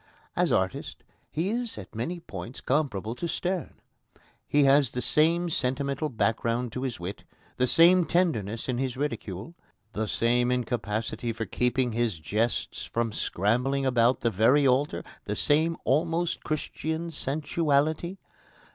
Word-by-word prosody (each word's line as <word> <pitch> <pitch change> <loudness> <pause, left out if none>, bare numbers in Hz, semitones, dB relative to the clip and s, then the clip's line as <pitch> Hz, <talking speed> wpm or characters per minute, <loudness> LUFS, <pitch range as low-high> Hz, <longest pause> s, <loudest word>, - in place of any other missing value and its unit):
As - - +2
artist, 95 0 -1 0.3
he 170 +6 -1
is 240 0 -3
at 95 -3 -9
many 165 +11 -3
points 130 -6 -8
comparable 115 -7 0
to 170 +8 -4
Sterne. 180 +1 -2 0.7
He 145 0 +4
has 140 -1 +5
the 125 - -4
same 160 +8 +2
sentimental 140 +3 -1
background 115 0 0
to 125 - -4
his 130 -6 -3
wit, 90 +4 -6 0.3
the 125 - +2
same 175 +5 +6
tenderness 115 - 0
in 125 -2 -1
his 130 -1 -2
ridicule, 115 - -4 0.4
the 110 +1 -1
same 120 +3 +2
incapacity 115 -1 -2
for 115 0 -4
keeping 125 +4 0
his 115 -5 0
jests 105 +10 -1
from 115 -1 -1
scrambling 125 +8 0
about 125 -1 +3
the 115 - +1
very 120 +8 +4
altar, 135 +3 +2 0.2
the 105 - -2
same 160 +7 +2
almost 165 +4 +1
Christian 160 +2 -3
sensuality. 155 +3 0
130 Hz, 140 wpm, -27 LUFS, 115-155 Hz, 0.7 s, same